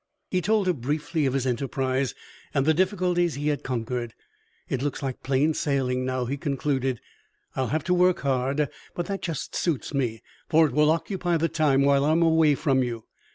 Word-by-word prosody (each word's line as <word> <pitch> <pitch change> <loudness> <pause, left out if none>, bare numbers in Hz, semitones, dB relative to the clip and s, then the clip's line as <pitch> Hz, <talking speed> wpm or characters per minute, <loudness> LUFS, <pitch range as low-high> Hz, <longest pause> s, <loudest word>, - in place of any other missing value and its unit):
He 185 - +1
told 210 +2 +2
her 180 - +2
briefly 150 +3 -1
of 130 - -1
his 135 -1 0
enterprise 130 0 -1 0.4
and 135 - +2
the 160 - +4
difficulties 180 -1 +1
he 145 +2 -1
had 145 -2 -1
conquered. 120 -2 -3 0.5
"It 130 - -2
looks 145 0 -3
like 130 -2 -4
plain 140 +4 +2
sailing 130 -4 0
now," 130 -1 -1
he 135 +4 -3
concluded. 135 -4 -1 0.6
"I - - 0
will 130 - 0
have 155 0 -1
to 180 - +1
work 180 0 +3
hard, 135 +2 0 0.3
but 175 - -2
that 195 +2 -4
just 165 -6 -4
suits 160 -6 -1
me, 120 -5 -1 0.3
for 160 0 +5
it 150 - -1
will 150 +2 +4
occupy 175 +1 0
the 165 +1 0
time 140 -4 +2
while 140 0 +4
I 155 +2 +3
am 170 +1 +3
away 160 -2 +4
from 135 -3 +1
you. 120 -3 -3
145 Hz, 200 wpm, -26 LUFS, 130-165 Hz, 0.6 s, for